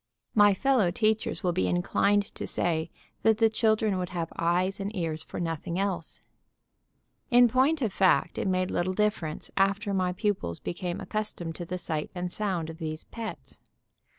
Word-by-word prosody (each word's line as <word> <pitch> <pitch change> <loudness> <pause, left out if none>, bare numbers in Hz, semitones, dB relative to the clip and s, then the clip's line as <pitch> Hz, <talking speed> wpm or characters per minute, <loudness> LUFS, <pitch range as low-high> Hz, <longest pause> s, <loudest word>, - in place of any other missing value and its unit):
My 205 -2 +6
fellow 250 -4 +3
teachers 215 +3 0
will 180 - +2
be 95 - 0
inclined 200 - +1
to - - -5
say 160 -1 0 0.3
that 220 -1 +4
the 225 -1 +4
children 220 -3 +2
would 180 -1 -3
have 170 -2 -4
eyes 180 +3 +1
and 200 +2 -4
ears 160 -4 -1
for - - -7
nothing 170 +1 -3
else. 190 -4 -3 1.1
In 245 -1 +7
point 270 +5 +2
of 215 -5 -1
fact 190 -2 +3
it - - -1
made 185 0 +1
little 185 +2 0
difference 195 -6 -1
after 200 +1 +1
my 185 -1 +1
pupils 185 - -1
became 175 0 -4
accustomed 195 -6 -3
to 175 - -5
the 180 +2 -4
sight 155 -3 -3
and 180 0 -3
sound 180 -6 -2
of 160 - -13
these 155 -1 -4
"pets." 230 -1 -8
185 Hz, 170 wpm, -28 LUFS, 170-210 Hz, 1.1 s, In